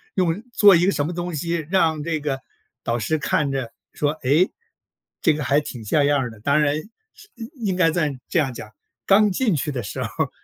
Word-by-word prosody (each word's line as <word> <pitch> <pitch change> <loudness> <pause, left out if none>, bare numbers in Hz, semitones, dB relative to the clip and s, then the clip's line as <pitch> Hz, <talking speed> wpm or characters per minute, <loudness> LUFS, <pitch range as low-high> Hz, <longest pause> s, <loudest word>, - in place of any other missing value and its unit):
用 180 +3 0
做 205 -4 +7
一 170 +1 +3
个 195 - +3
什 145 -5 -1
么 - - -3
东 175 0 -4
西， 165 +1 -2
让 160 -5 +2
这 160 -1 -1
个 145 -3 -2 0.4
导 115 +1 -1
师 155 +8 0
看 150 -1 0
着 130 -4 -3 0.2
说： 145 -1 +1
“诶， 150 +9 +3 0.7
这 160 - +5
个 150 0 -3
还 140 +3 +3
挺 125 -6 -7
像 145 +7 +2
样 145 0 +3
儿 125 -2 -2
的。” 110 -2 -13
当 140 +6 +2
然 145 -1 +2 0.4
是 425 - -17
嗯， 225 -1 -7 0.2
应 190 -2 0
该 180 -3 +4
在 155 -4 0
这 185 - 0
样 135 -5 +1
讲- 110 - -9 0.4
刚 205 +1 +5
进 215 -1 +1
去 150 +1 -2
的 125 -3 -3
时 100 - -5
候 - - -1
儿， - - -12
155 Hz, 240 characters per minute, -22 LUFS, 140-175 Hz, 0.7 s, 做